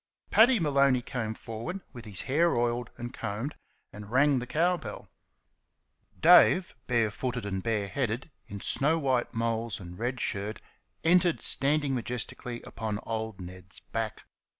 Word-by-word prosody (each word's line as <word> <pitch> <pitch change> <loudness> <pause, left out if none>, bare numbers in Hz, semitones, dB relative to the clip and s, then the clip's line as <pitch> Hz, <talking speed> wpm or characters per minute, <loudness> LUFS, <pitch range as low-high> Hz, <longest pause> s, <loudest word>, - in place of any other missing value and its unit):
Paddy 235 +1 +6
Maloney 140 -5 +3
came 110 -4 -3
forward 115 - -6
with 120 -3 -9
his 100 -4 -5
hair 165 +6 +2
oiled 120 0 0
and 120 +1 -6
combed, 110 +9 -4 0.4
and 105 0 -9
rang 135 +2 +4
the 125 - -6
cow 170 +7 +2
bell. 165 - -8 1.1
Dave, 180 +2 +6
bare 115 -4 +2
footed 125 0 -3
and 95 -2 -2
bare 105 -1 0
headed, 125 +4 -2 0.2
in 100 -1 -7
snow 150 +4 +2
white 130 -5 0
moles 115 -2 -1
and 90 -1 -10
red 125 +2 -2
shirt, 105 0 -2 0.4
entered 175 0 +4
standing 145 0 +1
majestically 120 0 -4
upon 110 -2 -4
old 110 -3 -3
Ned's 90 0 -9
back. 115 -1 -4
120 Hz, 145 wpm, -29 LUFS, 110-140 Hz, 1.1 s, Paddy